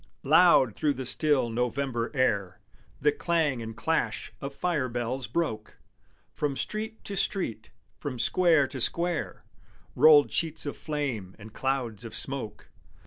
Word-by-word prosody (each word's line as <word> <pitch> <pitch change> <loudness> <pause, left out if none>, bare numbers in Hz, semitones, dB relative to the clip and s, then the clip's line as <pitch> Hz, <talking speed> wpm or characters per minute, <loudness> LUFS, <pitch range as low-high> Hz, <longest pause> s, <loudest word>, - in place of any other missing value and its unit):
Loud 150 - +5
through 150 -2 0
the 130 - -5
still 140 -3 +2
November 125 0 -1
air 100 -8 0 0.4
The 150 +2 +3
clang 150 -5 0
and 115 -1 -7
clash 115 -9 -1
of 140 - -4
fire 155 -8 -1
bells 120 +1 -3
broke; 110 -5 -3 0.6
From 145 -2 -2
street 220 +1 -4
to 200 - -6
street, 115 - -2 0.3
from 140 -4 -5
square 160 +4 +3
to 130 - -6
square, 170 +5 -2 0.5
Rolled 150 -2 +7
sheets 160 -2 0
of 145 - -4
flame 135 - -4
and 110 0 -12
clouds 125 -5 -2
of 115 - -8
smoke. 120 -6 -5
135 Hz, 140 wpm, -28 LUFS, 115-155 Hz, 0.6 s, Rolled